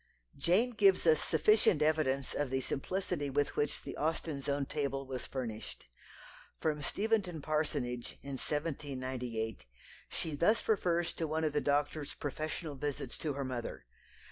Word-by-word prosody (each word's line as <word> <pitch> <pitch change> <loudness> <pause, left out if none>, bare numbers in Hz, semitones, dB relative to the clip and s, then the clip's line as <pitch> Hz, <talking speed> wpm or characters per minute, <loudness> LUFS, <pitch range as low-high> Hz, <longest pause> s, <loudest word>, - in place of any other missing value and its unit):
Jane 185 - +3
gives 200 -6 +4
us 160 -2 +6
sufficient 160 -1 +4
evidence 145 -4 +2
of 145 -2 0
the 130 +1 0
simplicity 150 +2 -2
with 145 +1 +1
which 145 - 0
the - - -6
Austens' 155 -2 -1
own 140 0 +1
table 140 -1 -2
was 130 -2 -4
furnished. 115 -5 -5 0.7
From 150 -2 0
Steventon 200 0 0
parsonage, 145 -5 -1
in 140 - -6
1798, 130 - -3 0.4
she 160 - -3
thus 175 +10 +3
refers 175 -5 +2
to 165 - -2
one 160 +1 0
of 155 -2 +1
the 150 - +2
doctor's 145 +1 0
professional 155 +2 -3
visits 140 -1 -3
to 150 -3 -1
her 140 0 -2
mother. 125 - -4
145 Hz, 145 wpm, -34 LUFS, 135-160 Hz, 0.7 s, us